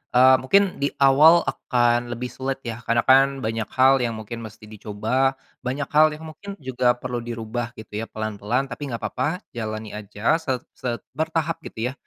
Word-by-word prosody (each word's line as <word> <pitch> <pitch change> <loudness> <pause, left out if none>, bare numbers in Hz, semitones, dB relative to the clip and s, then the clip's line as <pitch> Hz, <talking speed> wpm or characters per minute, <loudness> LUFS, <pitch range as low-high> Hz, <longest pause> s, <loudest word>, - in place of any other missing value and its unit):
Eee, 130 +1 +8
mungkin, 195 +7 +3
di 140 - +2
awal 150 +5 +6
akan 120 -2 +1
lebih 120 +1 -4
sulit 135 0 -3
ya, 115 0 -4
karena 115 0 +2
kan, 135 0 +4
banyak 110 0 -2
hal 135 +1 +4
yang 115 -2 -1
mungkin 110 +2 -7
mesti 110 -1 -11
dicoba, 110 +5 -1 0.3
banyak 135 +3 -2
hal 155 +1 +6
yang 160 +1 -10
mungkin 200 +4 -9
juga 125 -3 +1
perlu 125 -1 -4
dirubah, 115 +1 -5
gitu 110 -1 -7
ya, 115 - -4
pelan-pelan. 110 +4 -2
Tapi - - -7
nggak 115 - -4
papa, 150 - -2
jalani 110 -2 -5
aja, 105 +8 0
set 130 -5 -2
set 120 -2 -4
bertahap, 160 +2 -1
gitu 120 +3 -3
ya. - - -11
125 Hz, 180 wpm, -23 LUFS, 115-135 Hz, 0.3 s, Eee